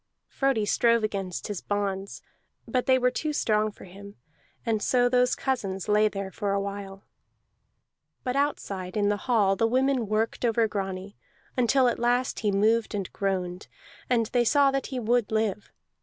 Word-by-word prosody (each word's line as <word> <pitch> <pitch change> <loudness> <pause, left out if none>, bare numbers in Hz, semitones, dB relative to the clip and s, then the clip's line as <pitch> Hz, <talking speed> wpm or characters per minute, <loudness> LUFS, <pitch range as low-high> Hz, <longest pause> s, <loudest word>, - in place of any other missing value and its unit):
Frodi 270 -6 0
strove 230 +2 +3
against 195 -4 -3
his 205 -4 -4
bonds, 200 -1 -3 0.4
but 255 -2 -1
they 260 -1 +5
were 250 0 +2
too 305 +4 -2
strong 215 -7 +1
for - - -15
him; 200 +2 -12 0.5
and 220 -2 0
so 245 +1 +3
those 250 0 +3
cousins 195 -8 -2
lay 210 +1 +4
there 195 -2 -5
for 200 0 -2
a 200 - +1
while. 195 0 -6 1.2
But 250 -1 -2
outside 200 -10 -2
in 205 -1 +2
the 205 - +1
hall 205 -6 +3
the 225 +3 +2
women 260 -1 +1
worked 215 +3 -1
over 230 -1 +2
Grani 195 -1 -5 0.4
until 255 +1 +3
at 240 - 0
last 245 +2 +1
he 210 -2 0
moved 220 +3 +2
and 195 -3 -4
groaned, 185 -2 -2 0.4
and 235 -2 +2
they 245 -1 +4
saw 280 +3 +4
that 270 -1 -2
he 260 - -4
would 235 -1 +1
live. 215 -2 -1
215 Hz, 170 wpm, -27 LUFS, 200-245 Hz, 1.2 s, they